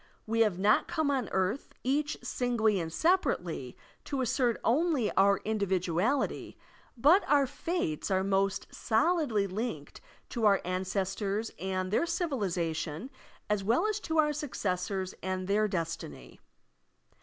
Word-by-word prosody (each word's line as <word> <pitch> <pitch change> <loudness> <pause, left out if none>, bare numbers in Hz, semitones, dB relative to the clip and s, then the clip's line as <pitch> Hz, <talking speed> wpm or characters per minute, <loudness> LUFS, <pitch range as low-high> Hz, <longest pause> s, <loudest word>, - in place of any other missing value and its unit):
We 225 +1 -1
have 210 -6 +3
not 205 +3 +3
come 315 -3 0
on 260 -6 -1
earth, 190 +8 -1
each 290 +4 0
singly 225 -5 +1
and 165 -1 -4
separately, 360 - 0 0.3
to 275 -2 -2
assert 245 -1 +1
only 285 -3 +2
our 200 +1 +4
individuality; 200 - 0 0.4
but 305 - +5
our 285 -1 +4
fates 290 - -3
are 190 -1 +2
most 195 0 +1
solidly 235 - +1
linked 190 -6 -5 0.3
to 225 -3 +1
our 200 -1 +5
ancestors 195 +3 -2
and 185 0 -2
their 330 +10 +2
civilization 190 - -2 0.4
as 210 -2 0
well 235 - +2
as 430 -1 0
to 325 -5 -3
our 300 -1 +4
successors 190 -9 -2
and 185 0 -3
their 210 +2 +2
destiny. 165 - -5
210 Hz, 130 wpm, -30 LUFS, 185-275 Hz, 0.4 s, but